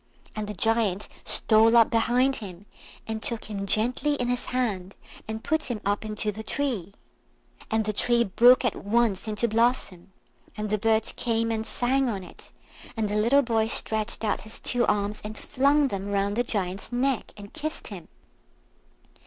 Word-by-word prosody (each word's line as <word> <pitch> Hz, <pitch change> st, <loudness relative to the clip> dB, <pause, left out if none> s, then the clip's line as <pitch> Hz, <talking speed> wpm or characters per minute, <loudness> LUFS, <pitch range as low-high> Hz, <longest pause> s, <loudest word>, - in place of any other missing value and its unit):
And 215 Hz, -1 st, -4 dB
the 210 Hz, -, -6 dB
Giant 215 Hz, -1 st, 0 dB, 0.2 s
stole 225 Hz, +1 st, +4 dB
up 230 Hz, -, +5 dB
behind 245 Hz, +3 st, +2 dB
him 195 Hz, -3 st, -9 dB, 0.4 s
and 220 Hz, -1 st, -4 dB
took 230 Hz, -1 st, -3 dB
him 200 Hz, -1 st, -4 dB
gently 250 Hz, +8 st, +2 dB
in 245 Hz, -3 st, -2 dB
his 245 Hz, 0 st, -1 dB
hand, 205 Hz, -7 st, -2 dB, 0.3 s
and 220 Hz, +1 st, -5 dB
put 315 Hz, 0 st, 0 dB
him 240 Hz, -4 st, -3 dB
up 205 Hz, +2 st, 0 dB
into 215 Hz, 0 st, -2 dB
the 215 Hz, +2 st, -8 dB
tree. 220 Hz, -6 st, -3 dB, 0.7 s
And 220 Hz, -1 st, 0 dB
the 215 Hz, -, -1 dB
tree 235 Hz, +3 st, +2 dB
broke 240 Hz, +5 st, +5 dB
at 240 Hz, -, 0 dB
once 220 Hz, -1 st, 0 dB
into 215 Hz, +2 st, 0 dB
blossom, 220 Hz, -5 st, 0 dB, 0.5 s
and 210 Hz, -1 st, -4 dB
the 215 Hz, -, +1 dB
birds 220 Hz, 0 st, +1 dB
came 230 Hz, -1 st, -1 dB
and 220 Hz, 0 st, -2 dB
sang 260 Hz, +1 st, +1 dB
on 195 Hz, -4 st, -4 dB
it, -, -, -14 dB, 0.5 s
and 215 Hz, -2 st, 0 dB
the 205 Hz, -, -2 dB
little 235 Hz, +7 st, +4 dB
boy 225 Hz, -2 st, +1 dB
stretched 220 Hz, -1 st, 0 dB
out 210 Hz, -, 0 dB
his 220 Hz, +2 st, 0 dB
two 245 Hz, -1 st, 0 dB
arms 205 Hz, 0 st, 0 dB
and 215 Hz, +1 st, -7 dB
flung 280 Hz, +1 st, +2 dB
them 195 Hz, -2 st, -4 dB
round 200 Hz, 0 st, 0 dB
the 240 Hz, -, +1 dB
Giant's 195 Hz, -3 st, -3 dB
neck, 255 Hz, +1 st, 0 dB
and 205 Hz, -1 st, -11 dB
kissed 310 Hz, 0 st, -4 dB
him. 190 Hz, -6 st, -9 dB
220 Hz, 175 wpm, -26 LUFS, 205-245 Hz, 0.7 s, up